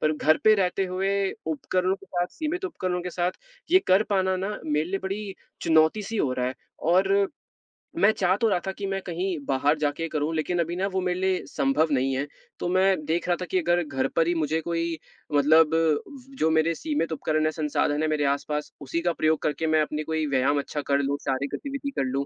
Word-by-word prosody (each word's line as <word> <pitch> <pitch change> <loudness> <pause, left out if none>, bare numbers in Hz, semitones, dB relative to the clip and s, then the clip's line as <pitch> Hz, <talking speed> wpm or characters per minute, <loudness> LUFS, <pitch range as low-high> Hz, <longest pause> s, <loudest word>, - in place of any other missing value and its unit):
पर 155 0 +2
घर 155 +1 +4
पे 215 0 +7
रहते 190 -1 +1
हुए 195 +1 0 0.2
उपकरणों 185 +4 0
के 195 - -17
साथ 175 -1 -1
सीमित 335 +4 -2
उपकरणों 185 - -2
के 180 - -4
साथ 175 +1 -1 0.4
ये 370 - +7
कर 190 +3 +5
पाना 190 -1 +2
ना 195 +3 -3
मेरे 150 0 +1
लिए 195 - 0
बड़ी 195 0 -4 0.3
चुनौती 160 +5 +3
सी 225 +3 -5
हो 130 -9 +1
रहा 125 -1 -1
है 130 - -3 0.4
और 195 +2 +3 0.7
मैं 210 - +6
चाह 185 0 +3
तो 230 - +4
रहा 180 -3 +2
था - - 0
कि 200 +1 -6
मैं 195 0 -2
कहीं 180 0 -2
बाहर 140 +3 +2
जाके 150 +2 -1
करूँ 155 +1 -1
लेकिन 170 +3 -1
अभी 170 +1 -1
ना 190 +2 0
वो 190 - 0
मेरे 180 0 -1
लिए 190 -1 0
सँभव 275 - +1
नहीं 135 0 +1
है, 140 +2 -2 0.3
तो - - -2
मैं 185 -4 +2
देख 170 +2 -1
रहा 175 - +3
था - - -2
कि 185 - +3
अगर 175 +1 +2
घर 135 -3 -1
पर 165 0 +3
ही 175 - +2
मुझे 160 0 0
कोई 165 0 -2 0.4
मतलब 155 +2 +5
व 250 - -1
जो 160 - +3
मेरे 160 +1 +2
सीमित 295 - -2
उपकरण 155 0 0
हैं, 155 - +2
संसाधन 150 -1 0
हैं 155 - +1
मेरे 150 -1 +1
आसपास, 150 +2 -1
उसी 140 +5 -2
का 175 - +1
प्रयोग 155 -1 +1
करके 155 +2 -1
मैं 155 0 +3
अपनी 150 0 -2
कोई 160 0 -1
व्यायाम 140 +1 +2
अच्छा 145 +1 -4
कर 140 - +3
लूँ, 140 0 0
शारीरिक 135 +1 -1
गतिविधि 280 0 -5
कर - - +2
लूँ, 140 +1 -1
165 Hz, 225 wpm, -26 LUFS, 150-190 Hz, 0.7 s, पे